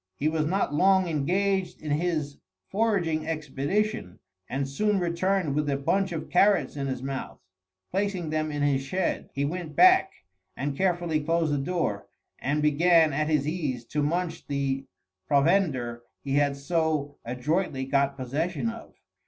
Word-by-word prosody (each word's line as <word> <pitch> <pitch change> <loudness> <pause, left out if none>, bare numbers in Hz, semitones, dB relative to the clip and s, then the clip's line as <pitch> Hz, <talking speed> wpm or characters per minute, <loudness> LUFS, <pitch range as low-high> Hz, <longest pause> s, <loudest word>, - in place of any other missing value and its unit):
He 145 - -1
was 155 -1 0
not 190 -3 0
long 190 +3 +4
engaged 180 +4 0
in 150 - -5
his 150 -2 -1 0.3
foraging 185 -8 +1
expedition, 155 - -2 0.3
and 135 +1 -1
soon 210 +9 +1
returned 175 -1 0
with 150 0 0
a 140 - +1
bunch 190 +7 0
of 160 -2 -4
carrots 195 -1 +3
in 140 -1 -3
his 130 -1 -4
mouth. 135 -1 -5 0.5
Placing 190 -4 -1
them 155 0 -1
in 145 -1 -2
his 140 -2 +2
shed, 180 +7 -2
he 140 +1 -1
went 165 0 -4
back 370 +1 +6 0.5
and 140 +1 -2
carefully 175 -3 +1
closed 160 0 +1
the 145 - +1
door 135 - -2 0.3
and 145 +2 0
began 160 +1 +4
at 155 +2 0
his 150 -2 +1
ease 145 -8 -2
to 150 - -1
munch 170 +3 -2
the 135 -1 -2 0.4
provender 140 -6 +2 0.2
he 135 - -2
had 145 0 +2
so 155 -1 -1
adroitly 130 +3 -1
got 140 0 +1
possession 150 - -2
of. 230 0 -12
155 Hz, 155 wpm, -27 LUFS, 140-180 Hz, 0.5 s, back